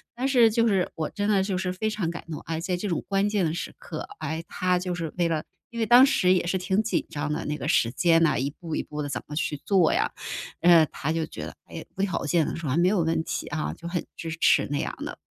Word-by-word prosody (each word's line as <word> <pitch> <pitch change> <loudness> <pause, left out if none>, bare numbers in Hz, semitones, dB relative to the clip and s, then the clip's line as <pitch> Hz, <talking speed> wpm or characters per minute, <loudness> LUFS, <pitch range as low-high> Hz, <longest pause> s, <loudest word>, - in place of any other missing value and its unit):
但 255 +2 -2
是 245 -4 +5
就 230 +1 +2
是 190 -3 +1
我 160 -2 -2
真 205 0 -2
的 195 -2 +3
就 190 -2 -1
是 180 -1 -2
非 215 +4 -1
常 205 -6 -2
感 170 - -6
动， 150 - -4
哎， 165 0 -3
在 180 0 -1
这 205 - -3
种 170 - -1
关 195 +1 +2
键 205 -3 +1
的 160 -1 0
时 - - -5
刻， - - -7
哎， 160 +1 -3
他 180 -1 0
就 180 -1 -3
是 165 -3 -4
为 170 -1 +2
了 155 -2 -1 0.3
因 235 - -9
为 225 - +1
当 245 +4 +8
时 185 -9 +3
也 180 -2 +2
是 190 - +1
挺 190 +3 +1
紧 220 - -1
张 150 0 -2
的， - - -3
那 150 0 -2
个 - - -5
时 115 - +3
间 165 +1 +3
呐， 160 - +3
一 135 +2 0
步 160 +1 -6
一 - - 0
步 150 0 -6
地 145 - -3
怎 120 - -3
么 150 - -7
去 150 -1 -1
做 190 -5 +4
呀， - - +1 0.5
嗯， 170 -3 +7
他 155 - -2
就 160 -1 0
觉 - - -9
得， - - -6
哎， - - -8
无 195 - -1
条 185 -7 -1
件 160 +2 +2
的 - - -3
说： 165 -4 -4
“啊， 150 - +1
没 175 +1 +4
有 190 -3 +2
问 160 0 +1
题 - - -3
啊。” 155 +1 -3
就 170 0 -7
很 175 -2 -2
支 165 - -6
持 - - +4
那 145 - 0
样 - - -3
的。 - - -6
175 Hz, 300 characters per minute, -26 LUFS, 160-195 Hz, 0.5 s, 当